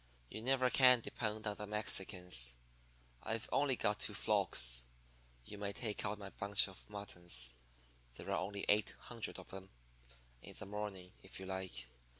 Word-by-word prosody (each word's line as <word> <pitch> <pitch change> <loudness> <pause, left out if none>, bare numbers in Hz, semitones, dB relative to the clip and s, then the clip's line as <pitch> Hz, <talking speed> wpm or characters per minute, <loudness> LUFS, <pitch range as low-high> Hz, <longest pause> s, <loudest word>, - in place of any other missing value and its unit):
'You 110 - -5
never 130 +1 +3
can 125 -2 +7
depend 110 -1 -3
on 105 -1 -1
the 105 - -5
Mexicans. 90 - +1 0.7
I've 115 0 -2
only 140 -2 +3
got 105 -2 +1
two - - 0
flocks. - - +4 0.6
You 105 - -8
may 100 -1 -2
take 110 -2 -2
out 105 +1 -2
my 100 -2 -8
bunch 100 0 +2
of 95 +1 -12
muttons 85 -11 -2 0.6
there - - -6
are - - +2
only 100 +1 -2
eight 105 0 +3
hundred 115 -2 -4
of 95 - -10
'em 95 0 -7 0.7
in - - -9
the - - -6
morning, 100 -3 -5
if 95 - -8
you 95 - -6
like. 95 -9 -4
100 Hz, 160 wpm, -38 LUFS, 95-105 Hz, 0.7 s, can